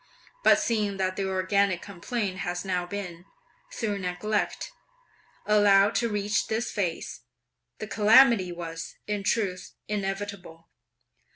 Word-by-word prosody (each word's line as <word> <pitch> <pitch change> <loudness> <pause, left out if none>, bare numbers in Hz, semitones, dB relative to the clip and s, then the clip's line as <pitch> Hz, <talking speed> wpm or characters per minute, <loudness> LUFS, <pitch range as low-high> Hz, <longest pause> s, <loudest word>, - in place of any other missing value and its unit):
But - - +6
seeing 210 -4 -1
that 185 -1 -1
the 195 0 -2
organic 190 0 +1
complaint 200 0 -4
has 175 0 -3
now 180 -2 -1
been, 180 -3 -6 0.5
through 215 - -2
neglect, 195 +3 -2 0.7
allowed 205 -1 +5
to 235 - +1
reach 205 0 0
this 225 +1 -2
phase, 180 -10 -3 0.6
this 215 - -7
calamity 220 -3 +5
was, 165 -1 -7
in 210 -1 -2
truth, 195 -3 -1
inevitable. 195 -4 -5
200 Hz, 115 wpm, -27 LUFS, 185-210 Hz, 0.7 s, But